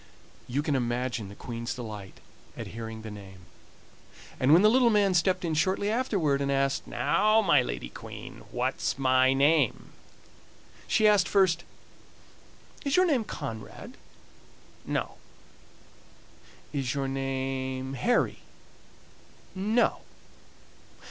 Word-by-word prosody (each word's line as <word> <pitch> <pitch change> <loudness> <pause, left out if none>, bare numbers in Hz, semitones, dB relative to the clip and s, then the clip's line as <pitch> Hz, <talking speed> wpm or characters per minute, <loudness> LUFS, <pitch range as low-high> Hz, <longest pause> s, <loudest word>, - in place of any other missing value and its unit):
You 140 +4 -1
can 145 -2 0
imagine 120 -3 -2
the 100 - -11
Queen's 115 0 -5
delight 105 -5 -8 0.4
at - - -5
hearing 110 -1 -7
the 110 - -7
name, 95 -3 -11 1.0
and 130 +2 +3
when 170 +5 +7
the - - +7
little 245 +1 +4
man 205 -3 +3
stepped 180 +1 +2
in 165 - -1
shortly 190 +6 +1
afterward 195 - 0
and 140 0 0
asked: 135 0 0
"Now, 215 +1 +2
my - - +5
lady - - -5
Queen, - - -10
what's - - -2
my 130 -1 +4
name?" 140 -1 +2 1.0
she 215 - +3
asked 205 -3 +4
first: 180 -4 +2 1.2
"Is 280 0 0
your 370 - +5
name 280 -9 +2
Conrad?" 110 - -7 0.9
"No." - - -2 1.6
"Is 135 -3 -2
your 135 -1 -1
name 135 0 -3
Harry?" 235 - +1 1.1
"No." 210 +5 +1
135 Hz, 115 wpm, -28 LUFS, 125-195 Hz, 1.6 s, when